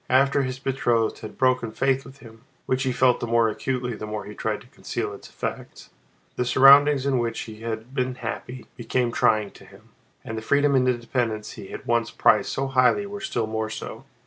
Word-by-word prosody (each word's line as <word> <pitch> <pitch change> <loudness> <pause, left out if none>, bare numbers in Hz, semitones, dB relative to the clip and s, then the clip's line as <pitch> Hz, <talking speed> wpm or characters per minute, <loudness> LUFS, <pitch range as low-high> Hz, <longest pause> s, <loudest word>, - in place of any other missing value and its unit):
After 135 +2 +4
his 130 -1 -3
betrothed 120 -4 0
had 110 - -9
broken 125 -3 +1
faith 135 +3 0
with 135 0 -14
him—which 130 +3 -6
he 130 -1 0
felt 125 0 +3
the 120 - -3
more 115 -1 +3
acutely 125 +2 -3
the 110 -1 -7
more 105 0 -5
he 105 - -8
tried - - -3
to - - -17
conceal - - -5
its - - -12
effects—the - - -7
surroundings 135 +2 +6
in 135 -2 +2
which 115 -1 -2
he 110 -1 -8
had 115 +2 -5
been 130 -1 -1
happy 125 +1 -6
became 120 0 -1
trying 110 -3 +2
to - - -16
him, - - -18 0.4
and 110 0 -4
the - - -9
freedom 145 +5 +2
and 130 -1 +3
independence 120 -3 -2
he - - -10
had - - -9
once 120 -1 +1
prized 105 -2 +3
so 135 - -2
highly 130 +7 +3
were 200 0 -7
still 115 - -1
more 110 0 -3
so. 110 +2 -7
125 Hz, 200 wpm, -24 LUFS, 115-135 Hz, 0.4 s, surroundings